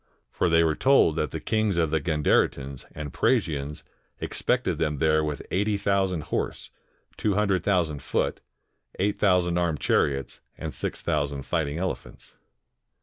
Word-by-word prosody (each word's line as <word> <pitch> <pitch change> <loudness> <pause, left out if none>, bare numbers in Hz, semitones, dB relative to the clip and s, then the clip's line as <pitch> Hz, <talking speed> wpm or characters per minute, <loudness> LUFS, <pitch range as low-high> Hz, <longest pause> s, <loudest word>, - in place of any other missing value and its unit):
For - - +1
they 85 0 +5
were 80 -1 +2
told 130 - +4
that 75 - 0
the - - -5
kings 110 -4 0
of 80 -3 +1
the 80 - +2
Gandaritans 70 -4 +1
and 75 -2 -6
Praesians 75 0 0 0.4
expected 95 -10 -1
them 75 -3 0
there 80 +2 +3
•mth. 75 -1 -3
eighty 105 +2 +1
thousand 95 -4 +1
horse, - - -3 0.5
two 105 -3 0
hundred 100 -3 +1
thousand 85 -8 +1
foot, - - -1 0.6
eight 100 +2 0
thousand 90 -3 +3
armed 85 -4 0
chariots, 70 -3 0 0.2
and - - -5
six - - -4
thousand 70 -1 -1
fighting 75 -1 -1
elephants. 95 +2 -5
80 Hz, 145 wpm, -26 LUFS, 75-95 Hz, 0.6 s, they